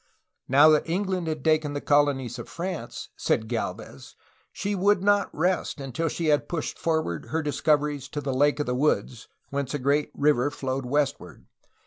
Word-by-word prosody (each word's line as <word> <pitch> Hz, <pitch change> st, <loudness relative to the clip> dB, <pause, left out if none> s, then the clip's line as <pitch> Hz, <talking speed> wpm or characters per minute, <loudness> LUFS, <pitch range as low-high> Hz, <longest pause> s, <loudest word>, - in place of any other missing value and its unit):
Now 140 Hz, +4 st, +6 dB
that 155 Hz, +1 st, +3 dB
England 185 Hz, -1 st, -1 dB
had 155 Hz, -3 st, -3 dB
taken 155 Hz, -2 st, +2 dB
the 145 Hz, -, -2 dB
colonies 140 Hz, -4 st, +1 dB
of 120 Hz, -, -8 dB
France, 180 Hz, 0 st, -5 dB
said 110 Hz, -, 0 dB
Gdlvez, 110 Hz, -, -5 dB, 0.4 s
she 205 Hz, -, -3 dB
would 200 Hz, 0 st, +2 dB
not 205 Hz, 0 st, +3 dB
rest 175 Hz, 0 st, -1 dB
until 135 Hz, +4 st, -2 dB
she 165 Hz, +1 st, -1 dB
had 145 Hz, -1 st, +2 dB
pushed 165 Hz, -3 st, -4 dB
forward 160 Hz, -, -1 dB
her 155 Hz, +7 st, -2 dB
discoveries 145 Hz, -2 st, 0 dB
to 150 Hz, -, -4 dB
the 140 Hz, -2 st, -2 dB
Lake 145 Hz, +3 st, +2 dB
of 150 Hz, -, 0 dB
the 125 Hz, -, -1 dB
Woods, 125 Hz, -3 st, 0 dB, 0.2 s
whence 140 Hz, 0 st, -2 dB
a -, -, +1 dB
great 145 Hz, +2 st, +1 dB
river 145 Hz, -2 st, +2 dB
flowed 135 Hz, -3 st, -4 dB
westward. 145 Hz, +2 st, -2 dB
145 Hz, 170 wpm, -26 LUFS, 135-160 Hz, 0.4 s, Now